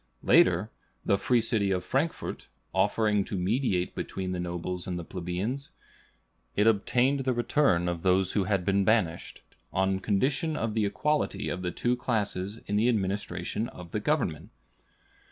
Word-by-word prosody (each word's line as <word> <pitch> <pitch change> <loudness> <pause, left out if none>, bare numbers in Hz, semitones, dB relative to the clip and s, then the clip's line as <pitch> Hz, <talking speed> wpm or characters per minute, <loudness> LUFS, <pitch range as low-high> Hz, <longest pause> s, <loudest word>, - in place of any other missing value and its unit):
Later, - - +4 0.3
the 100 - +4
free 120 +4 +2
city 110 -3 +1
of 90 -1 0
Frankfort 150 +5 -2 0.3
offering 105 -2 +2
to 100 - -4
mediate 95 -1 0
between 95 -1 -4
the 90 - -3
nobles 90 +1 -4
and 90 -1 -2
plebeians, 95 +10 -4 0.8
it 105 - +3
obtained 120 +5 +3
the 130 -1 0
return 120 -7 +2
of 85 -1 -2
those 95 +1 +3
who 100 -3 +1
had 95 -2 0
been 100 +1 +2
banished, 95 -5 0 0.3
on 95 0 +1
condition 135 - 0
of 115 -1 -1
the 105 -2 +1
equality 150 +10 -1
of 90 - -3
the 90 - -1
two 120 +8 0
classes 105 -4 -2
in 105 - -1
the 115 +4 +3
administration 105 +1 -2
of 90 -1 -11
the 105 - -1
government. 110 - -1
100 Hz, 155 wpm, -28 LUFS, 90-120 Hz, 0.8 s, Later